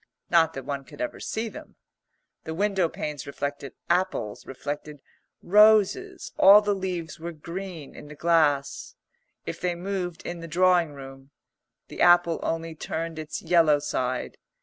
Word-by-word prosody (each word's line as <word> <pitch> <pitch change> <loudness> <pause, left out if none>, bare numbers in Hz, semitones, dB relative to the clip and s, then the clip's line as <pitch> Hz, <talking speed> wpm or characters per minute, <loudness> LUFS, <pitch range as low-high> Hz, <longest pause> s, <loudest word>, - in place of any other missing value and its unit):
Not 165 -2 +4
that 135 -2 -6
one 140 -1 -4
could - - -15
ever 310 -1 -4
see 225 +1 -3
them. - - -11 0.7
The 160 - -5
window 195 -2 +1
panes 150 -3 -5
reflected 140 -1 -5
apples, 175 - -1
reflected 145 +2 -6 0.4
roses; 215 - +4
all 200 +2 +9
the 205 -1 0
leaves 180 -5 -4
were 170 +1 -5
green 170 -1 -8
in - - -11
the 150 - -11
glass. 150 -4 +1 0.5
If - - -6
they 180 0 0
moved 180 -1 -4
in 175 0 -5
the 165 - -8
drawing 175 -1 +3
room, 135 -1 -11 0.6
the - - -7
apple 175 -1 +5
only 165 0 -3
turned 160 +1 -5
its 155 -1 -6
yellow 165 -3 +4
side. 130 -3 -3
165 Hz, 150 wpm, -26 LUFS, 145-185 Hz, 0.7 s, all